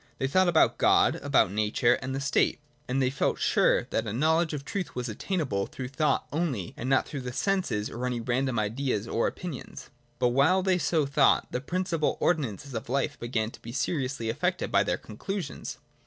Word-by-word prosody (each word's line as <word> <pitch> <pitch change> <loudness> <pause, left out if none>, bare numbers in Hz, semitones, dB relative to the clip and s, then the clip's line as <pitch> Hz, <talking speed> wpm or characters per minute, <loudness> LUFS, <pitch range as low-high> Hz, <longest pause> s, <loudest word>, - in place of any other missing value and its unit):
They - - -1
thought 185 +6 +3
about 165 -2 +3
God, - - +4
about - - +2
Nature, 110 +3 +2
and 130 +1 -3
the - - -2
State; 140 0 +1 0.3
and 130 +2 0
they 130 -1 +2
felt 140 - 0
sure - - +3
that 110 - -1
a - - -2
knowledge 160 +7 +2
of 150 -3 -3
the - - -22
truth 195 -2 -4
was 125 0 -3
obtainable 120 - -2
through 125 -1 -6
thought 150 +3 0
only, 145 - -2
and 125 - -4
not 135 - +3
through 140 - -5
the 125 0 -5
senses 175 - 0
or 125 +2 -4
any 125 -1 -2
random 125 +1 0
ideas 110 0 -1
or 115 - +1
opinions. 175 -8 -7 0.3
But 125 -1 +2
while 150 +10 +3
they 185 -1 +2
so 160 -3 +1
thought, 140 0 +3
the 125 - -2
principal 175 0 -1
ordi 175 -2 +3
nances 135 +7 -10
of 115 +3 -5
life 140 +2 -1
began 115 -2 -2
to - - -14
be 115 - -8
seriously 130 -2 -2
affected 115 - -1
by - - +4
their - - -1
con 105 - -12
clusions. 195 - -5
135 Hz, 205 wpm, -28 LUFS, 120-160 Hz, 0.3 s, God